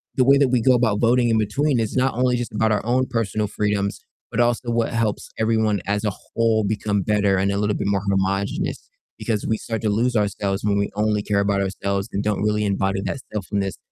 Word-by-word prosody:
the 130 - +4
way 140 +2 +6
that 140 - +3
we 125 -1 +2
go 130 +2 +4
about 115 -4 +2
voting 120 +1 +3
in 110 - +3
between 130 +5 +1
is 110 +1 -2
not 130 +1 +2
only 125 0 +2
just 120 -3 -4
about 110 +1 +1
our 105 - 0
own 125 +2 +2
personal 110 -3 -1
freedoms, 100 -1 -1 0.3
but 120 - -2
also 120 0 +1
what 115 0 0
helps 110 -2 -1
everyone 110 -3 +1
as 105 +1 -1
a 105 - +1
whole 110 +2 0
become 105 -1 -1
better, 100 -2 +2
and 100 +1 +1
a 100 - -1
little 105 0 0
bit - - -2
more 100 -1 +1
homogenous, 100 0 -1 0.3
because 110 -3 -2
we 110 - +1
start 115 -1 -4
to 110 - 0
lose 115 +4 +1
ourselves 100 -1 -1
when 100 -1 +1
we 100 - 0
only 105 0 +1
care 105 -1 +1
about 100 0 +1
ourselves, 100 +1 -2
and 100 - -1
don't 105 -1 -1
really 105 0 +1
embody 95 -1 0
that 100 +7 -3
selfness- 100 -1 -2
105 Hz, 225 wpm, -22 LUFS, 100-115 Hz, 0.3 s, way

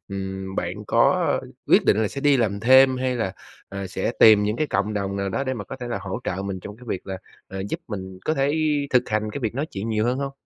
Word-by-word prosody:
ừm, 95 -1 -5
bạn 95 +4 -3
có - - +3 0.3
quyết - - +5
định - - +4
là 105 - +1
sẽ 140 - -6
đi 145 -1 +4
làm 100 -4 0
thêm 130 +3 +6
hay 130 0 -1
là, 110 -5 -1 0.4
à, 100 -1 -5
sẽ 95 +4 -2
tìm 110 -2 +8
những 105 +2 0
cái 155 - 0
cộng 105 -4 -1
đồng 100 -1 -2
nào 100 0 -1
đó 135 +8 -2
để 130 - -1
mà 105 -5 -6
có 135 - -8
thể 125 -2 -6
là 120 - -2
hỗ 95 -1 -4
trợ 95 +1 -2
mình 100 -1 -4
trong 105 +3 -9
cái 125 - -15
việc 95 - -4
là, 95 -1 -5 0.3
à, 95 - -7
giúp - - -3
mình 95 -3 -6
có 155 - +1
thể 140 +3 +1 0.3
thực 125 -1 +2
hành 110 0 -1
cái 145 - -5
việc 115 -2 -2
nói 140 +4 -2
chuyện 105 +3 -5
nhiều 110 -1 0
hơn 125 +2 0
hông? 140 0 -3
105 Hz, 270 wpm, -23 LUFS, 95-125 Hz, 0.4 s, tìm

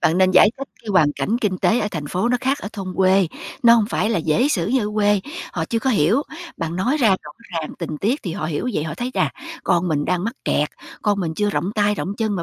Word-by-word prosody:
Bạn 165 +3 +2
nên 185 0 +5
giải 185 +3 +6
thích 275 - -6
cái 225 - -11
hoàn 160 -7 +4
cảnh 225 +9 -1
kinh 195 -6 -1
tế 230 - +3
ở 210 - -1
thành 155 -5 -4
phố 185 +9 0
nó 250 - +3
khác 270 +2 0
ở - - -6
thôn 185 -3 -6
quê, 190 0 +4 0.4
nó 235 0 +8
hông 220 -3 +3
phải 215 - 0
là 220 - +1
dễ 165 - +2
xử 175 - 0
như 235 -1 +1
ở - - -5
quê, 205 -1 +3 0.3
họ - - -2
chưa 230 - -1
có 260 +4 0
hiểu. 215 - +3 0.3
Bạn 165 +1 -3
nói 245 +11 +1
ra 240 -7 +3
rõ 190 - 0 0.2
ràng 165 -2 -3
tình 155 - -4
tiết 245 +9 0
thì 175 - -4
họ 160 -5 -3
hiểu 160 +10 -2
vậy, 150 - -1
họ 155 - -4
thấy: 245 +1 -3
"Chà! - - +1 0.3
Con 175 +1 +2
mình 145 -3 0
đang 180 +1 0
mắc 230 +3 -2
kẹt, - - +1 0.3
con 205 -2 +1
mình 160 -2 -2
chưa 210 +2 0
rộng 200 0 -1
tay, 210 -1 +2
rộng 195 - -3
chân 215 -3 -1
mà 170 - -2
200 Hz, 275 wpm, -21 LUFS, 175-225 Hz, 0.4 s, nó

